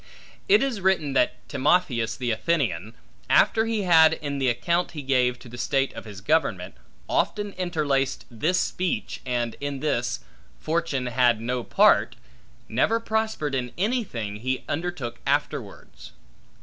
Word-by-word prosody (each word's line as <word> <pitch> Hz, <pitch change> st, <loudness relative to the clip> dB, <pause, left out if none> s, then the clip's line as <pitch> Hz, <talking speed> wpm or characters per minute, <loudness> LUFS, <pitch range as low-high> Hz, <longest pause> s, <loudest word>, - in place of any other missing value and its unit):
It 410 Hz, -4 st, +6 dB
is 250 Hz, -7 st, -2 dB
written 180 Hz, -7 st, +1 dB
that 125 Hz, -1 st, 0 dB
Timotheus 135 Hz, -5 st, +1 dB
the 125 Hz, -2 st, -1 dB
Athenian, 110 Hz, -, -1 dB, 0.3 s
after 220 Hz, 0 st, +4 dB
he 225 Hz, -2 st, -1 dB
had, 160 Hz, -3 st, +6 dB
in 145 Hz, -3 st, -4 dB
the 135 Hz, -, +1 dB
account 170 Hz, +11 st, 0 dB
he 150 Hz, -3 st, -6 dB
gave 125 Hz, -2 st, +2 dB
to 125 Hz, -, -14 dB
the 120 Hz, +1 st, -10 dB
state 135 Hz, +2 st, 0 dB
of -, -, -9 dB
his 100 Hz, -2 st, -9 dB
government, 110 Hz, -, 0 dB, 0.3 s
often 205 Hz, -1 st, 0 dB
interlaced 145 Hz, -7 st, -1 dB
this 155 Hz, +11 st, +1 dB
speech, 185 Hz, -1 st, -2 dB
and 120 Hz, -2 st, -1 dB
in 145 Hz, -1 st, -3 dB
this, 120 Hz, -5 st, -1 dB, 0.4 s
Fortune 155 Hz, -5 st, -1 dB
had 120 Hz, -2 st, +3 dB
no 125 Hz, +2 st, -2 dB
part, -, -, +4 dB, 0.5 s
never 210 Hz, -, +1 dB
prospered 220 Hz, -10 st, -1 dB
in 125 Hz, -2 st, -2 dB
anything, 185 Hz, -, -2 dB
he 130 Hz, +4 st, -2 dB
undertook 145 Hz, -7 st, -4 dB
afterwards. -, -, -3 dB
140 Hz, 140 wpm, -25 LUFS, 120-175 Hz, 0.5 s, It